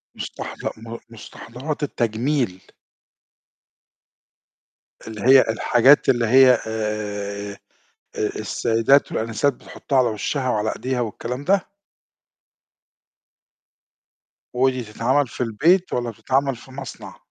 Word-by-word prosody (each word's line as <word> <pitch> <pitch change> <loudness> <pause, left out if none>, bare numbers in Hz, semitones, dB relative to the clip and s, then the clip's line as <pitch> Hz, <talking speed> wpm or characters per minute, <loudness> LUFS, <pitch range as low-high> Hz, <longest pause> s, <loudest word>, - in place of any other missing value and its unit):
مستحض - - -7
م 115 +1 -8
مستحضرات 125 +6 -7
التجميل. 120 -5 -1 2.5
اللي 110 -2 -7
هي 130 +3 +7
الحاجات 120 +5 +4
اللي 120 -3 +3
هي 130 0 +6
آآ، 105 -2 -4 0.6
السيدات 115 +5 +1
والآنسات 115 +5 0
بتحطها 135 +2 -4
على 130 -2 +4
وشها 130 +5 -2
وعلى 110 -2 0
إيديها 130 -1 -2
والكلام 120 +4 -5
ده؟ 195 +5 +3 2.9
ودي 130 0 +1
تتعمَل 120 +6 0
في 125 - -4
البيت 165 - +2
والّا 120 -1 -1
بتتعمل 130 +5 -1
في 120 +3 -15
مصنع؟ 130 -1 -9
120 Hz, 95 wpm, -22 LUFS, 110-135 Hz, 2.9 s, هي